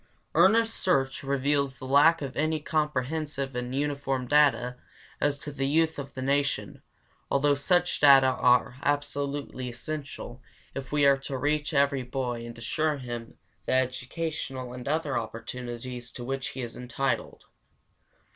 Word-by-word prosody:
Earnest 220 +7 +5
search 135 -8 +1
reveals 140 0 0
the 130 - -8
lack 145 +4 +5
of 135 -2 -5
any 155 +1 +1
comprehensive 150 -2 -2
and 125 +1 -3
uniform 140 -3 -1
data 130 -3 +3 0.4
as 145 -1 +1
to 145 +1 -7
the 135 -1 -2
youth 160 +2 +2
of 140 0 -7
the 130 - -4
Nation, 140 +1 0 0.5
although 145 +1 +3
such 175 +5 +1
data 135 -2 +8
are 125 -1 +3
absolutely 145 -2 -2
essential 125 0 -6 0.3
if 135 -1 -6
we 145 -1 +3
are 140 0 +6
to 135 0 -5
reach 150 +2 0
every 140 -2 +2
boy 125 -2 -3
and 120 - -9
assure 150 +6 0
him 120 -3 -7 0.3
the - - +1
educational 130 0 -2
and 125 0 -8
other 150 -1 0
opportunities 120 +2 -6
to 120 - -7
which 135 +1 -3
he 130 - -5
is 120 - -6
entitled. 125 +2 -2
140 Hz, 145 wpm, -28 LUFS, 125-145 Hz, 0.5 s, data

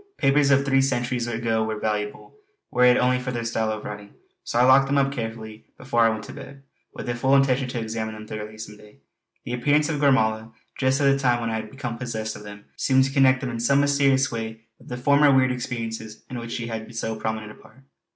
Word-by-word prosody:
Papers 140 +1 +3
of 140 0 +4
three 135 0 +3
centuries 125 -2 -1
ago 115 -1 -1
were 110 0 -3
valuable, 105 -1 -3 0.4
were 125 0 +4
it 125 0 +6
only 125 0 +2
for 125 0 -4
their 120 -1 -4
style 110 -2 -1
of 110 -1 -5
writing. 105 -1 -8 0.3
So - - -3
I 120 - +5
locked 130 +2 +6
them 140 +1 +1
all 140 - +4
up 135 - -4
carefully 110 -3 -6
before 125 -2 0
I 115 - +5
went 110 -1 -3
to - - -10
bed, 135 0 -11 0.3
with - - -8
full 135 +2 +3
intention 135 -1 +2
to 125 -1 -4
examine 110 -1 -4
them 110 0 -9
thoroughly 110 0 -7
some 105 -1 -9
day. 105 0 -18 0.5
The 120 - -4
appearance 145 +5 +2
of 150 -2 -2
Gormala 110 -5 +2 0.2
just 130 +2 +1
at - - +3
the 140 0 +4
time 125 -3 +2
when 115 -1 -2
I 110 - -1
had 110 -1 -6
become 125 -4 -6
possessed 110 -3 -4
of - - -10
them 105 0 -11
seemed 130 -1 +3
to 135 +1 -3
connect 130 -2 +4
them 130 -2 -3
in 115 - -5
some 140 +4 +3
mysterious 140 -2 +2
way 110 -1 -5 0.2
with - - -18
the 125 - -4
former 140 +3 +4
weird 130 -1 +4
experiences 115 -3 -5
in 125 - -4
which 115 0 -6
she 120 - -3
had 115 0 -6
so 110 0 -2
prominent 110 -1 -4
a - - -13
part. 130 +4 -20
120 Hz, 240 wpm, -24 LUFS, 110-135 Hz, 0.5 s, it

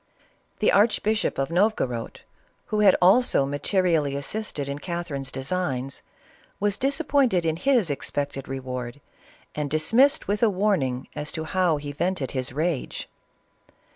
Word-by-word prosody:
The 215 - +4
archbishop 215 +1 +2
of 135 +1 -1
Novogorod, 170 - 0 0.5
who 210 - +2
had 200 -3 +6
also 190 - +4
materi 170 +6 +1
ally 145 -3 0
assisted 140 +1 -3
in 140 +1 -4
Catherine's 160 -6 -4
designs, 135 -2 -3 0.6
was 205 0 +1
disappointed 275 - +1
in 160 -1 +1
his 220 - +2
expected 140 -1 -3
reward, 130 -1 -5 0.5
and 150 -1 -3
dismissed 225 - +3
with 205 +1 -1
a 230 - +5
warning 180 -11 0
as 150 0 -3
to 160 - -4
how 175 -1 +1
he 145 0 -6
vented 150 -2 -2
his 130 -2 -1
rage. 155 +1 -2
160 Hz, 135 wpm, -25 LUFS, 140-205 Hz, 0.6 s, had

